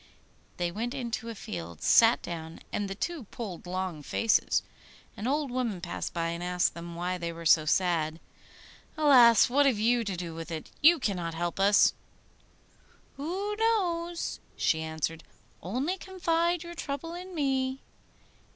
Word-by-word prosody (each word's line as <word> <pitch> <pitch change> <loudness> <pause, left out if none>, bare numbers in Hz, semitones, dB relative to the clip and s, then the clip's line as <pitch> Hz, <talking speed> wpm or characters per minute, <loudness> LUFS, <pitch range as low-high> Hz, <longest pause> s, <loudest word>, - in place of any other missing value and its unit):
They 175 -1 -1
went 235 +7 -3
into 235 -3 -4
a 230 - -6
field, 85 - -7
sat 230 +1 +5
down, 165 -1 -7
and 205 -1 -1
the 195 - -4
two 320 - -4
pulled 195 -5 -7
long 185 -3 -3
faces. 220 +9 +2 0.5
An 210 - -4
old 285 0 0
woman 240 -7 -1
passed 170 - -4
by, 165 -1 -1
and 170 +1 -4
asked 180 0 +1
them 170 0 -8
why 180 +1 -2
they 170 -1 -3
were 165 0 -9
so 155 -1 +5
sad. 160 -1 +1 0.8
'Alas! 250 -7 +7
what 280 +3 +4
have 255 -6 +2
you 235 +3 +2
to 195 -4 -3
do 170 -2 -5
with 165 +1 -7
it? 160 -2 -6
You 335 +3 +7
cannot 180 - -2
help 175 +2 -3
us.' 200 +1 +5 1.2
'Who 380 +8 -3
knows?' 350 -7 0 0.2
she 160 - +1
answered. 160 +1 -3 0.4
'Only 270 - -2
confide 345 -2 0
your 345 0 -8
trouble 320 0 -5
in 365 +1 -8
me. 265 -3 0
215 Hz, 155 wpm, -29 LUFS, -, 1.2 s, Alas